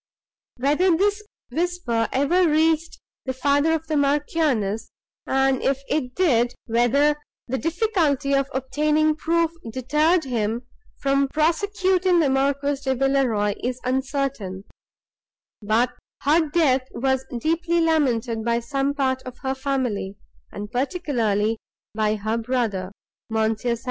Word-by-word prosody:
Whether 300 Hz, +7 st, +3 dB
this 410 Hz, +3 st, +1 dB, 0.3 s
whisper 320 Hz, -7 st, -1 dB
ever 325 Hz, +6 st, +3 dB
reached 320 Hz, +2 st, +1 dB, 0.3 s
the 260 Hz, -, -2 dB
father 285 Hz, +4 st, +2 dB
of 320 Hz, 0 st, -2 dB
the 310 Hz, -1 st, -2 dB
Marchioness, 280 Hz, -7 st, 0 dB, 0.4 s
and, 270 Hz, -1 st, +2 dB
if 275 Hz, 0 st, 0 dB
it 255 Hz, -4 st, -1 dB
did, 245 Hz, -9 st, +2 dB
whether 255 Hz, +6 st, +3 dB, 0.3 s
the 260 Hz, +1 st, -2 dB
difficulty 320 Hz, -, +1 dB
of 275 Hz, 0 st, +1 dB
obtaining 300 Hz, +4 st, +1 dB
proof 330 Hz, +1 st, +1 dB, 0.2 s
deterred 300 Hz, +8 st, +2 dB
him 235 Hz, -2 st, -2 dB, 0.3 s
from 275 Hz, 0 st, +1 dB
prosecuting 365 Hz, +4 st, +2 dB
the 290 Hz, -5 st, +3 dB
Marquis 280 Hz, +1 st, +1 dB
de 265 Hz, -2 st, 0 dB
Villeroi, 250 Hz, -6 st, +1 dB
is 250 Hz, 0 st, -2 dB
uncertain; 260 Hz, -7 st, -2 dB, 1.0 s
but 225 Hz, +4 st, +2 dB, 0.3 s
her 310 Hz, +2 st, +3 dB
death 270 Hz, -5 st, +2 dB
was 265 Hz, +1 st, 0 dB, 0.2 s
deeply 335 Hz, +4 st, +1 dB
lamented 255 Hz, -9 st, +1 dB
by 235 Hz, 0 st, +1 dB
some 275 Hz, +4 st, -1 dB
part 260 Hz, -2 st, 0 dB
of 255 Hz, -1 st, -9 dB
her 265 Hz, 0 st, 0 dB
family, 260 Hz, -8 st, -2 dB, 0.3 s
and 205 Hz, +1 st, -7 dB
particularly 235 Hz, -, 0 dB, 0.3 s
by 215 Hz, 0 st, +1 dB
her 215 Hz, +2 st, -2 dB
brother, 225 Hz, -6 st, -1 dB, 0.4 s
M. 220 Hz, 0 st, +1 dB
St. 235 Hz, +2 st, -2 dB
270 Hz, 125 wpm, -23 LUFS, 240-310 Hz, 1.0 s, Whether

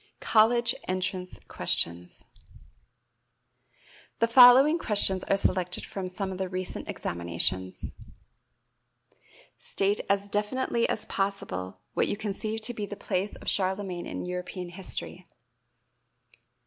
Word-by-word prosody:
College 235 Hz, +2 st, +4 dB
Entrance 185 Hz, 0 st, -3 dB
Questions. 85 Hz, +1 st, -2 dB, 1.9 s
The 230 Hz, -, +2 dB
following 255 Hz, +6 st, +8 dB
questions 195 Hz, -, +2 dB
are 195 Hz, -, +2 dB
selected 180 Hz, -2 st, 0 dB
from 190 Hz, -2 st, -5 dB
some 190 Hz, +1 st, -3 dB
of 185 Hz, -, -6 dB
the 190 Hz, -1 st, -2 dB
recent 185 Hz, 0 st, -5 dB
examinations: 85 Hz, +2 st, -1 dB, 1.7 s
State 200 Hz, +1 st, 0 dB
as 200 Hz, 0 st, +1 dB
definitely 230 Hz, +4 st, 0 dB
as 215 Hz, -, -2 dB
possible 95 Hz, -, -3 dB
what -, -, +1 dB
you 205 Hz, -, -2 dB
conceive 215 Hz, +1 st, -3 dB
to 240 Hz, +2 st, +2 dB
be 210 Hz, -3 st, -4 dB
the 205 Hz, -, -6 dB
place 195 Hz, +1 st, -2 dB
of -, -, -13 dB
Charlemagne 190 Hz, -2 st, -1 dB
in -, -, -5 dB
European 180 Hz, 0 st, -5 dB
history. 185 Hz, +2 st, -5 dB
195 Hz, 110 wpm, -28 LUFS, 180-215 Hz, 1.9 s, following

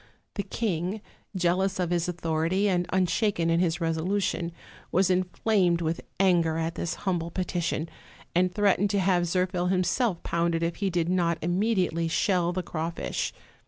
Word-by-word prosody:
The -, -, -2 dB
king, 195 Hz, -2 st, -2 dB, 0.4 s
jealous 185 Hz, +1 st, +1 dB
of 175 Hz, -1 st, 0 dB
his 175 Hz, -1 st, +1 dB
authority, 165 Hz, +3 st, 0 dB
and 180 Hz, -2 st, +1 dB
unshaken 185 Hz, -2 st, +1 dB
in 165 Hz, -, +3 dB
his 175 Hz, -1 st, +1 dB
resolution, 170 Hz, +1 st, -1 dB, 0.4 s
was 185 Hz, +1 st, +3 dB
inflamed 180 Hz, 0 st, +2 dB
with 165 Hz, 0 st, -1 dB, 0.2 s
anger 170 Hz, -4 st, +3 dB
at 165 Hz, 0 st, -1 dB
this 170 Hz, -, -3 dB
humble 175 Hz, -3 st, 0 dB
petition; 170 Hz, -2 st, -2 dB, 0.5 s
and 180 Hz, +2 st, +3 dB
threatened 205 Hz, 0 st, +2 dB
to 200 Hz, 0 st, +1 dB
have 180 Hz, -2 st, +2 dB
Zirphil 180 Hz, 0 st, 0 dB
him 185 Hz, -1 st, +2 dB
self 210 Hz, -2 st, 0 dB
pounded 170 Hz, 0 st, 0 dB
if 170 Hz, 0 st, -1 dB
he 200 Hz, -2 st, 0 dB
did 170 Hz, -2 st, 0 dB
not 175 Hz, -2 st, +1 dB
immediately 180 Hz, -2 st, +1 dB
shell 175 Hz, +1 st, +1 dB
the 185 Hz, 0 st, -2 dB
craw 160 Hz, -1 st, -3 dB
fish. 170 Hz, -, -3 dB
175 Hz, 160 wpm, -27 LUFS, 170-190 Hz, 0.5 s, in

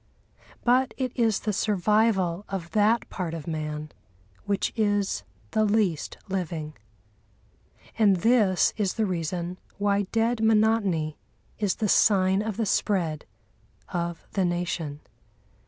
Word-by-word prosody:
But 255 Hz, +1 st, +3 dB
it 255 Hz, -2 st, -1 dB
is 225 Hz, -4 st, +1 dB
the 210 Hz, -, -1 dB
survival 205 Hz, -2 st, +1 dB
of 185 Hz, -4 st, -5 dB
that 220 Hz, +2 st, +2 dB
part 170 Hz, -4 st, -3 dB
of 160 Hz, -3 st, -7 dB
man 155 Hz, -1 st, -4 dB, 0.5 s
which 200 Hz, -1 st, -1 dB
is 205 Hz, -, +1 dB, 0.3 s
the 215 Hz, -, +2 dB
least 205 Hz, -7 st, 0 dB
living. 165 Hz, -5 st, -3 dB, 1.3 s
And 205 Hz, -3 st, +5 dB
this 205 Hz, -2 st, +3 dB
is 200 Hz, -4 st, 0 dB
the 220 Hz, -, +1 dB
reason 175 Hz, 0 st, -3 dB, 0.2 s
why 200 Hz, -1 st, +1 dB
dead 225 Hz, 0 st, +1 dB
monotony 210 Hz, -8 st, +2 dB, 0.4 s
is 205 Hz, -3 st, +1 dB
the 215 Hz, -, -1 dB
sign 190 Hz, -1 st, +4 dB
of 215 Hz, -2 st, -3 dB
the 225 Hz, -, 0 dB
spread 175 Hz, -6 st, 0 dB, 0.6 s
of 170 Hz, -1 st, -3 dB
the 195 Hz, -, 0 dB
Nation. 175 Hz, -4 st, -2 dB
195 Hz, 120 wpm, -26 LUFS, 170-215 Hz, 1.3 s, And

